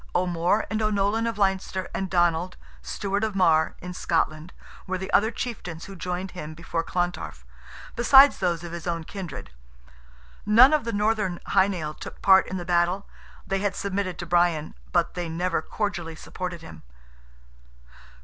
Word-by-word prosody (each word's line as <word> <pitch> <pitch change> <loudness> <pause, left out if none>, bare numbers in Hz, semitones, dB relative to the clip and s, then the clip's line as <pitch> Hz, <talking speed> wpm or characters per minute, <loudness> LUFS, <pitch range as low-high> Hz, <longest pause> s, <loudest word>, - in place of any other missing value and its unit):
O'More 180 +3 +1
and 220 0 0
O'Nolan 215 +2 +1
of 230 -1 -3
Leinster, 190 -1 0
and 190 -1 -3
Donald, 175 0 +1 0.2
Steward 200 +1 -2
of 215 -2 -1
Marr, 160 -4 +3
in 180 0 -6
Scotland, 160 -1 -1 0.4
were 185 0 -1
the 190 +1 -6
other 220 +2 +4
chieftains 190 -9 -5
who 195 - -9
joined 180 +1 -4
him 155 -3 -7
before 165 0 -3
Clontarf, 175 - -3 0.5
besides 270 +4 +7
those 175 -3 0
of 170 - -7
his 170 0 -6
own 170 -1 -2
kindred. 170 - -8 0.9
None 235 +7 +7
of 305 -6 +2
the 230 - -2
Northern 210 -4 0
Hy 195 -1 +4
Nial 165 -6 -3
took - - -10
part 190 -1 +5
in 190 - -4
the 175 - -5
battle—they 180 +2 -2
had 200 0 -1
submitted 195 -2 -2
to 175 - -5
Brian, 175 -3 +1 0.2
but - - +1
they 175 -2 -4
never 170 +1 -1
cordially 175 -4 -3
supported 180 +1 -6
him. 80 - -11
180 Hz, 160 wpm, -25 LUFS, 170-200 Hz, 0.9 s, besides